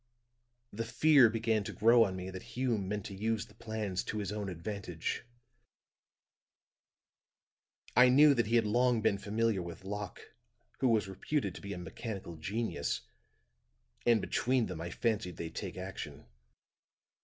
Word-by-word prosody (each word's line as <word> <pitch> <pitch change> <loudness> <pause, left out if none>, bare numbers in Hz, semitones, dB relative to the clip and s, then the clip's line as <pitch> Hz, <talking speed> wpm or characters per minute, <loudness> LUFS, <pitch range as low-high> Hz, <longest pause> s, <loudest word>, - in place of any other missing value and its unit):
"The 115 +3 -2
fear 140 +1 +6
began 110 -1 +1
to - - -5
grow 115 +2 +6
on 95 -2 -3
me 95 +1 -5
that 95 0 -7 0.2
Hume 115 -7 0
meant 105 -1 -3
to - - -6
use 110 +2 -1
the - - -19
plans 110 -4 -3
to 110 - -3
his 100 -2 -2
own 105 -2 -3
advantage; 90 -1 -4 2.7
I 125 +1 +8
knew 145 +3 +7
that 120 -5 +1
he 115 - +1
had 115 -2 +4
long 120 +1 +2
been 105 -3 +2
familiar 105 0 0
with 85 +1 -8
Locke, 105 0 -6 0.5
who 130 - +3
was 110 -4 +3
reputed 100 - -2
to - - -10
be 100 0 -5
a - - -6
mechanical 95 0 -6
genius, 95 -2 -2 1.0
and 120 -2 +4
between 125 -1 +1
them, 80 - -6
I 85 - -4
fancied 105 -3 -1
they'd 80 -1 -5
take - - -5
action. - - -7
105 Hz, 155 wpm, -32 LUFS, 95-115 Hz, 2.7 s, I